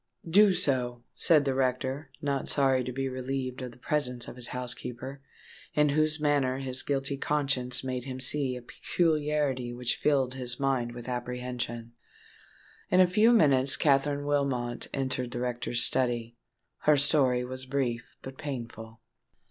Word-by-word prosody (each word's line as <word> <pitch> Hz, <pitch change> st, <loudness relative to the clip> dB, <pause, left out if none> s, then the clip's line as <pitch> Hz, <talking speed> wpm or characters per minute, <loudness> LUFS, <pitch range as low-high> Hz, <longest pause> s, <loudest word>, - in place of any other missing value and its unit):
"Do 200 Hz, +4 st, +6 dB
so," 125 Hz, -9 st, -1 dB
said 155 Hz, -4 st, +3 dB
the 135 Hz, -, +1 dB
rector, 130 Hz, +2 st, -1 dB
not 140 Hz, -2 st, -1 dB
sorry 135 Hz, -2 st, +3 dB
to 125 Hz, -, -4 dB
be 135 Hz, +2 st, -2 dB
relieved 130 Hz, 0 st, -4 dB
of 125 Hz, -1 st, -6 dB
the 115 Hz, -, -17 dB
presence 125 Hz, -3 st, -2 dB
of -, -, -8 dB
his 125 Hz, -1 st, 0 dB
housekeeper, 125 Hz, +2 st, -4 dB, 0.5 s
in 150 Hz, 0 st, +4 dB
whose 155 Hz, +2 st, +2 dB
manner 145 Hz, -4 st, +1 dB
his 130 Hz, -1 st, +2 dB
guilty 140 Hz, 0 st, -2 dB
conscience 135 Hz, -4 st, +3 dB
made 130 Hz, -1 st, -4 dB
him 130 Hz, -1 st, -6 dB
see 130 Hz, 0 st, +2 dB
a 125 Hz, -, -8 dB
peculiarity 150 Hz, -5 st, -1 dB
which 120 Hz, 0 st, -1 dB
filled 135 Hz, -4 st, +1 dB
his 125 Hz, -2 st, -1 dB
mind 130 Hz, -3 st, 0 dB
with 120 Hz, 0 st, -8 dB
apprehension. 125 Hz, -1 st, -4 dB, 1.0 s
In 185 Hz, -, +3 dB
a 185 Hz, -, +8 dB
few 210 Hz, +6 st, +4 dB
minutes 140 Hz, -, +4 dB
Katherine 145 Hz, 0 st, +2 dB
Wilmot 135 Hz, -4 st, -1 dB
entered 130 Hz, -2 st, -2 dB
the 120 Hz, -, -5 dB
rector's 120 Hz, -1 st, -2 dB
study. 120 Hz, -2 st, 0 dB, 0.4 s
Her 150 Hz, -1 st, +4 dB
story 135 Hz, -3 st, +3 dB
was 130 Hz, +1 st, -6 dB
brief 125 Hz, -3 st, -2 dB
but 130 Hz, 0 st, -9 dB
painful. 115 Hz, -5 st, -7 dB
130 Hz, 150 wpm, -28 LUFS, 125-145 Hz, 1.0 s, a